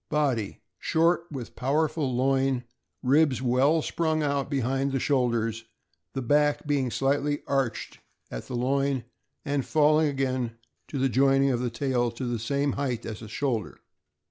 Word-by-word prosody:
Body. 135 -9 0
— - - -55
Short, 170 +1 +1
with 130 -6 -7
powerful 150 +1 0
loin, 135 0 +1 0.4
ribs 135 -1 +3
well 135 +5 +3
sprung 160 -2 0
out 140 -1 0
behind 135 0 0
the 135 - +1
shoulders, 115 -4 0 0.5
the 135 - -3
back 145 +3 +2
being 140 -3 +1
slightly 140 +3 0
arched 135 -4 -2 0.3
at - - -6
the 125 - -4
loin, 135 +1 0 0.4
and 145 -2 0
falling 155 +2 +3
again 130 -4 -1 0.3
to 145 - -5
the 135 0 +2
joining 135 +1 +3
of 120 - 0
the 125 0 -1
tail 120 0 0
to 130 +2 -5
the 120 -2 -2
same 140 +5 0
height 130 -5 -2
as 110 -1 -5
the 110 - -9
shoulder. 115 -3 -2
135 Hz, 155 wpm, -27 LUFS, 125-145 Hz, 0.5 s, ribs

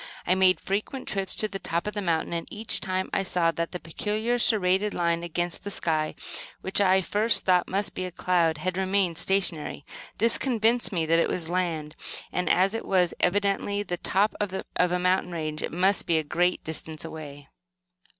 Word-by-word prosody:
I 180 - +3
made 185 -3 +4
frequent 210 +7 -3
trips 195 -2 -3
to 215 - +1
the 195 -1 -6
top 170 -2 -2
of 210 - -3
the 205 - -2
mountain, 170 -3 0
and, 170 0 -3
each 215 +1 -2
time, 185 0 -1
I - - +2
saw 175 -3 +1
that 170 0 -3
the 180 - -5
peculiar 215 +8 -1
serrated 200 -2 +2
line 170 -1 +1
against 175 0 -3
the 205 - -4
sky, 155 -5 -1 0.5
which 190 +2 +1
I 190 -1 +5
at 190 - -1
first 220 +3 +2
thought 180 -1 +3
must 200 +2 -1
be 185 - -3
a 180 - -5
cloud, 170 -3 +1
had 185 +4 -2
remained 190 -3 +1
stationary. 180 -7 0 0.3
This 230 +2 +3
convinced 235 -2 +2
me 170 -4 0
that 165 +1 +3
it - - +2
was 165 -2 -2
land, 165 -4 -1 0.4
and 180 0 -1
as 190 +3 +3
it 225 - -4
was 180 -3 +2
evidently 200 +2 +1
the 180 -3 -3
top 200 +5 +2
of 205 -2 -2 0.2
a 180 0 +2
mountain 180 0 +1
range, 155 -2 -3
it - - -3
must 185 +3 +2
be 165 - +3
a 160 - 0
great 175 +4 0
distance 160 0 -4
away. 145 -3 -9
180 Hz, 200 wpm, -26 LUFS, 170-200 Hz, 0.5 s, I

